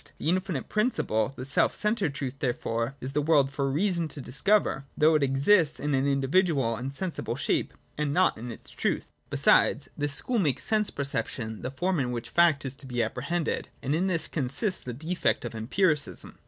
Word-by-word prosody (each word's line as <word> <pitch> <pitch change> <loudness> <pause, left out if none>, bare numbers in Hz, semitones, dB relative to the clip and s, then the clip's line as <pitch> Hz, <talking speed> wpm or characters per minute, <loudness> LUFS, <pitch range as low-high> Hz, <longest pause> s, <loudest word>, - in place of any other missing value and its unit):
'The - - -2
infinite 180 -6 -1
principle, 210 - 0
the 130 - -5
self 135 - +2
centred 210 -9 +1
truth, 135 -3 -3
therefore, 120 0 -1
is 130 - -4
in - - -16
the 150 - +2
world 145 -3 +3
for 140 -1 -1
reason 170 +3 +1
to 150 - -8
discover: 140 +4 +1
though 155 +1 +5
it 155 - +3
exists 145 +5 +3
in 145 0 -1
an 135 +1 +2
individual 140 -2 +2
and 125 +4 -4
sensible 175 +5 -3
shape, - - 0 0.3
and 150 -1 0
not 185 +5 +3
in 120 +2 -7
its - - -9
truth. - - -1 0.2
Besides, - - +3
this 145 0 -2
school 245 +7 -1
makes 150 -9 0
sense 215 -1 +1
perception 120 -5 -3
the - - -3
form 175 +6 -1
in 125 -2 -1
which 120 -1 -5
fact 170 -5 +4
is 135 0 -5
to 140 - -11
be 120 -2 0
apprehended: 140 +9 -2
and 140 - 0
in 175 +5 +1
this 170 -4 0
consists 155 - -1
the 125 - -6
defect 160 +2 -1
of 120 - -5
Empiricism. 145 - -1
145 Hz, 195 wpm, -27 LUFS, 130-175 Hz, 0.3 s, though